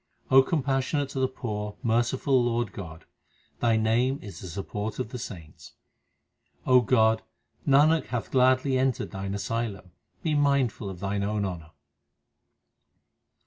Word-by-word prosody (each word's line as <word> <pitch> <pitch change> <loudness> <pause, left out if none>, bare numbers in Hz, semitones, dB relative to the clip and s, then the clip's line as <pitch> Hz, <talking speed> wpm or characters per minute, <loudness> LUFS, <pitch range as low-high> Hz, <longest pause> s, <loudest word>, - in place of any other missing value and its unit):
O 135 0 +9
compassionate 135 -1 0
to 135 - -4
the 130 - +2
poor, 105 -5 -5
merciful 120 +3 +2
Lord 120 -3 0
God, 80 -5 -9 0.5
Thy 115 -2 +3
name 120 +5 +2
is 95 -5 -9
the 95 - -8
support 105 +4 -5
of - - -3
the 125 0 -6
saints. 85 -10 -10 0.9
O 125 -1 +6
God, 110 -2 +3 0.5
Nanak 150 +3 +4
hath 120 -3 -4
gladly 130 +1 +3
entered 130 -3 0
Thine 95 0 -4
asylum; 100 -2 -3 0.3
be 155 - 0
mindful 140 -7 +1
of 90 -2 -9
Thine 100 0 -1
own 105 0 -1
honour. 85 -4 -6
115 Hz, 135 wpm, -27 LUFS, 100-130 Hz, 0.9 s, O